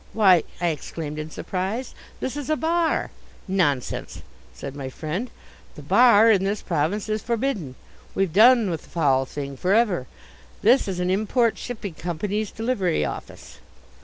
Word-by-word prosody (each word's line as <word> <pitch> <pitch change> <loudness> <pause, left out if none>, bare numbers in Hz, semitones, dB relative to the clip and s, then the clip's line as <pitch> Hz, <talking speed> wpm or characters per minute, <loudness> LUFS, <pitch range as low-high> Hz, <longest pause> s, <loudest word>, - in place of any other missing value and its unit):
"Why," 190 -7 +5
I 175 0 +1
exclaimed 155 0 -5
in 155 +1 -5
surprise, 195 +10 -4 0.3
"this 260 - -3
is 290 -2 -5
a 310 - +3
bar!" 330 +1 0 0.4
"Nonsense!" 155 -10 -1 0.3
said 135 - -8
my 135 -2 -5
friend. 165 - -4 0.5
"The - - -10
bar 230 -2 +6
in 195 -3 +3
this 200 +1 -2
province 170 +6 -1
is 215 0 -1
forbidden. 225 - -2 0.4
We've 195 -5 0
done 225 0 +6
with 165 - -3
the - - -19
foul 135 -5 +2
thing 140 -1 -6
for 185 +8 +2
ever. 200 - +2 0.6
This 240 +4 +4
is 185 -2 -3
an 180 0 0
Import 220 +4 +1
Shipping 215 -7 -6
Company's 190 +6 -3
Delivery 220 -8 -1
Office." - - -8
195 Hz, 155 wpm, -24 LUFS, 160-230 Hz, 0.6 s, bar